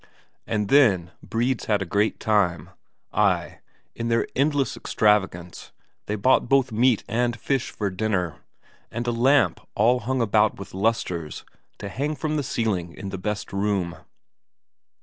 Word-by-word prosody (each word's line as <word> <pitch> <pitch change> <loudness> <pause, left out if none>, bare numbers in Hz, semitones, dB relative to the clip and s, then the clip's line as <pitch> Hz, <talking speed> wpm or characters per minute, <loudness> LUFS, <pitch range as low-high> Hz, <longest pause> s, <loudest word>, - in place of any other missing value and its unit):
And 105 -2 -1
then 100 -12 +4
Bredes 120 +3 -1
had 105 -2 +1
a - - -7
great 100 +5 0
time; 100 -7 +1 0.4
ay, 95 -5 +1 0.3
in 115 - -4
their 115 0 +2
endless 140 0 +1
extravagance 95 -5 0 0.4
they 105 - -1
bought 120 +3 +2
both 135 -2 +3
meat 115 +1 +3
and 120 +1 0
fish 135 +2 -1
for 100 -3 -3
dinner, 90 -5 -1 0.5
and 120 +2 -4
a 120 - 0
lamp 120 - +3 0.2
all 125 +2 +3
hung 130 +3 -2
about 110 -2 +2
with 100 - -9
lustres 95 -6 -2 0.3
to 100 - -6
hang 145 +9 -2
from 155 +2 -2
the 150 - +1
ceiling 100 -10 -2
in 100 - -6
the 95 - -5
best 105 +1 -4
room. 100 -3 -1
110 Hz, 150 wpm, -24 LUFS, 95-120 Hz, 0.5 s, then